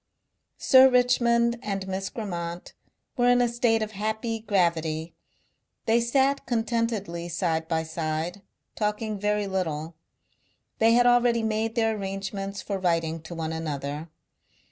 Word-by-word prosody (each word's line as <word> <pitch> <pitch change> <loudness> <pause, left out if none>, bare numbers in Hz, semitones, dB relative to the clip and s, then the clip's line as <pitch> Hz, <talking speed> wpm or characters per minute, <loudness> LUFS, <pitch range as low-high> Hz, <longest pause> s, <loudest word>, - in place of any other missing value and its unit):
Sir 260 0 +7
Richmond 235 -1 +3
and 195 -3 -3
Miss 190 0 -3
Grammont 175 -5 -5 0.4
were 245 0 +4
in 245 0 +5
a 245 - +3
state 235 -2 +1
of 215 - -5
happy 220 +2 -2
gravity; 170 -6 0 0.7
they 230 +1 +3
sat 270 +3 +1
contentedly 225 -7 -1
side 165 -2 -1
by 160 -1 0
side, 160 +3 -3 0.3
talking 210 0 -2
very 210 0 0
little. 165 -5 -3 0.9
They 225 +1 +5
had 245 +1 +5
already 245 -1 +4
made 220 +1 -1
their 225 -2 +2
arrangements 195 0 -5
for 200 -2 -3
writing 165 -3 0
to 160 +2 -9
one 160 -1 -3
another. 150 0 -4
205 Hz, 130 wpm, -26 LUFS, 170-230 Hz, 0.9 s, Sir